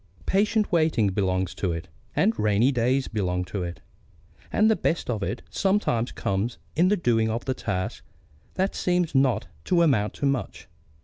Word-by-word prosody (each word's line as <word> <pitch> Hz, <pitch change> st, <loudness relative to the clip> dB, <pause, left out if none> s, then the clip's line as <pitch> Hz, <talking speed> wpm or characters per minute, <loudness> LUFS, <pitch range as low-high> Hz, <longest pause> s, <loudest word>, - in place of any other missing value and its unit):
Patient 210 Hz, +2 st, +2 dB
waiting 155 Hz, -, +3 dB
belongs 95 Hz, -2 st, 0 dB
to 95 Hz, -, -2 dB
it; 85 Hz, +1 st, -5 dB, 0.3 s
and 220 Hz, +4 st, +2 dB
rainy 105 Hz, +5 st, +3 dB
days 130 Hz, +2 st, +1 dB
belong 90 Hz, -4 st, -1 dB
to 100 Hz, +1 st, -4 dB
it; 85 Hz, -1 st, -5 dB, 0.7 s
and 215 Hz, -, +4 dB
the 220 Hz, -, +4 dB
best 165 Hz, -6 st, -1 dB
of 110 Hz, -3 st, -2 dB
it 100 Hz, +5 st, -3 dB
sometimes 190 Hz, -, +1 dB
comes 100 Hz, +5 st, -2 dB, 0.2 s
in 175 Hz, +4 st, +4 dB
the 205 Hz, +2 st, +3 dB
doing 115 Hz, -9 st, +2 dB
of 115 Hz, +2 st, -3 dB
tasks 100 Hz, -8 st, -3 dB, 0.5 s
that 190 Hz, +1 st, 0 dB
seem 180 Hz, -1 st, +1 dB
not 130 Hz, -5 st, +2 dB, 0.2 s
to 170 Hz, -2 st, +3 dB
amount 115 Hz, -10 st, +2 dB
to -, -, -2 dB
much. 135 Hz, -2 st, -2 dB
120 Hz, 165 wpm, -25 LUFS, -, 0.7 s, and